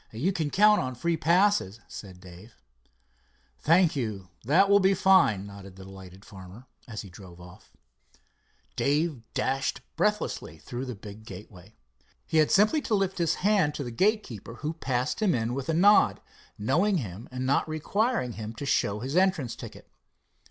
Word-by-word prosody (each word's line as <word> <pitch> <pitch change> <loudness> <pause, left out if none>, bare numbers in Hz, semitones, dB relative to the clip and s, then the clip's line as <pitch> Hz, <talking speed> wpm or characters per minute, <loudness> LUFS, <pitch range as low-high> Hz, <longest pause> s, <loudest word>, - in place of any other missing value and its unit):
"You 145 - -1
can 160 -4 -2
count 210 +6 +4
on 130 0 -4
free 170 +7 -1
passes," 170 - +2
said 95 -3 -10
Dave. 90 +5 -14 1.0
"Thank 165 +1 +3
you, 105 -8 -4
that 165 - +4
will 200 0 +5
be 195 0 +3
fine," 135 - +4
nodded 100 -2 -11
the 95 - -11
delighted 95 0 -13
farmer 95 +5 -12 0.2
as 110 -3 -6
he 100 - -11
drove 90 -2 -13
off. 90 +1 -15 1.0
Dave 150 -2 0
dashed 135 +1 -1
breathlessly 210 +5 -1
through 125 +2 -6
the 125 -2 -6
big 105 +1 -11
gateway. 95 -1 -12 0.5
He 160 - -1
had 155 - +4
simply 215 +10 +3
to 225 - 0
lift 195 -2 -1
his 165 -1 +1
hand 195 -8 +3
to 145 - -4
the 120 - -6
gatekeeper, 125 - -1
who 150 +5 -4
passed 130 - -2
him 195 -6 +2
in 115 0 -2
with 135 +2 -5
a - - +2
nod, 205 +5 +5 0.4
knowing 175 - +1
him 105 - -7
and 130 0 -4
not 140 +4 +1
requiring 195 - -1
him 110 0 -7
to 140 - -6
show 105 -5 0
his 135 +5 -4
entrance 185 -10 +1
ticket. - - -11
130 Hz, 165 wpm, -27 LUFS, -, 1.0 s, will